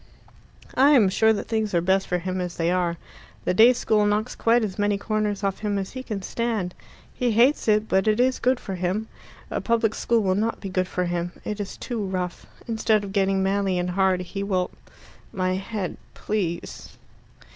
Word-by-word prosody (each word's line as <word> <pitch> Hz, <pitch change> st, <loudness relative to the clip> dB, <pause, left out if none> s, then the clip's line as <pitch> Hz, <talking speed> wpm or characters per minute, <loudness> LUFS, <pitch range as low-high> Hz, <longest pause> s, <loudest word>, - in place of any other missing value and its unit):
"I 270 Hz, +2 st, +5 dB
am 220 Hz, -9 st, +5 dB
sure 220 Hz, +3 st, +4 dB
that 220 Hz, -, -2 dB
things 220 Hz, -4 st, -1 dB
are -, -, +5 dB
best 190 Hz, +3 st, +1 dB
for 180 Hz, -, 0 dB
him 185 Hz, +1 st, -3 dB
as 175 Hz, -2 st, -5 dB
they 170 Hz, +1 st, +1 dB
are. 175 Hz, -2 st, 0 dB, 0.5 s
The -, -, +2 dB
day 225 Hz, +6 st, +7 dB
school 220 Hz, -3 st, +1 dB
knocks 210 Hz, +3 st, 0 dB
quite 230 Hz, +1 st, +3 dB
as 200 Hz, -2 st, -4 dB
many 205 Hz, 0 st, +2 dB
corners 210 Hz, -1 st, -1 dB
off 195 Hz, -1 st, -1 dB
him 205 Hz, -2 st, -1 dB
as 195 Hz, -1 st, -3 dB
he 260 Hz, -, -6 dB
can 210 Hz, -6 st, -5 dB
stand. 220 Hz, -5 st, -2 dB, 0.4 s
He 245 Hz, -2 st, 0 dB
hates 245 Hz, +6 st, +3 dB
it, 215 Hz, 0 st, +3 dB
but 190 Hz, 0 st, +2 dB
it 215 Hz, +1 st, +3 dB
is 255 Hz, +1 st, +2 dB
good 255 Hz, 0 st, +2 dB
for 195 Hz, -, -6 dB
him. 185 Hz, +5 st, -2 dB, 0.4 s
A -, -, -1 dB
public 225 Hz, -2 st, +1 dB
school 235 Hz, 0 st, +1 dB
will 190 Hz, -1 st, +2 dB
not 220 Hz, +4 st, -1 dB
be 195 Hz, -, -6 dB
good 185 Hz, 0 st, 0 dB
for 180 Hz, -1 st, -1 dB
him. 175 Hz, 0 st, -2 dB
It 210 Hz, 0 st, -3 dB
is 205 Hz, -, -5 dB
too 235 Hz, -4 st, -4 dB
rough. 185 Hz, -2 st, -4 dB, 0.2 s
Instead 220 Hz, -2 st, +1 dB
of 195 Hz, -1 st, -7 dB
getting 195 Hz, -1 st, +2 dB
manly 195 Hz, -1 st, +1 dB
and 180 Hz, 0 st, -1 dB
hard, 190 Hz, 0 st, +2 dB
he 180 Hz, +2 st, -5 dB
will 185 Hz, -2 st, -1 dB, 0.3 s
" -, -, -24 dB
"My 185 Hz, -1 st, 0 dB
head, 195 Hz, 0 st, -4 dB, 0.2 s
please." 185 Hz, -5 st, -4 dB
200 Hz, 205 wpm, -24 LUFS, 185-220 Hz, 0.5 s, day